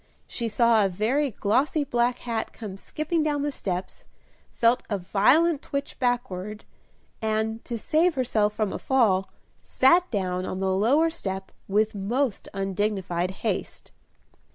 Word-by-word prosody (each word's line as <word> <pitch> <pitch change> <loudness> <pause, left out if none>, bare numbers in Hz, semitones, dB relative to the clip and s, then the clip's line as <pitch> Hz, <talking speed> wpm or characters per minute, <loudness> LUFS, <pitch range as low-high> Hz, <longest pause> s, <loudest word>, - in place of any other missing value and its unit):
she 235 - -3
saw 225 0 +4
a 195 - +2
very 235 +10 0
glossy 260 +8 +1
black 245 -2 +1
hat 230 -2 -3
come 210 -4 -8
skipping 310 - -2
down 295 -2 0
the 290 - -1
steps, 185 -7 -4 0.4
felt 235 +1 +3
a 205 - 0
violent 275 - +3
twitch 280 0 -5
backward, 215 -5 -2 0.6
and, 220 +1 -1
to 235 - -4
save 320 +8 +2
herself 225 -5 +1
from 210 -2 -2
a - - -4
fall, 210 -8 +2 0.3
sat 345 +7 +3
down 185 -4 -1
on 185 - -4
the 190 0 +1
lower 280 +12 +3
step 190 - -5 0.2
with 215 +2 +1
most 220 +4 -1
undignified 195 -2 -1 0.2
haste. - - -3
220 Hz, 140 wpm, -26 LUFS, 195-265 Hz, 0.6 s, saw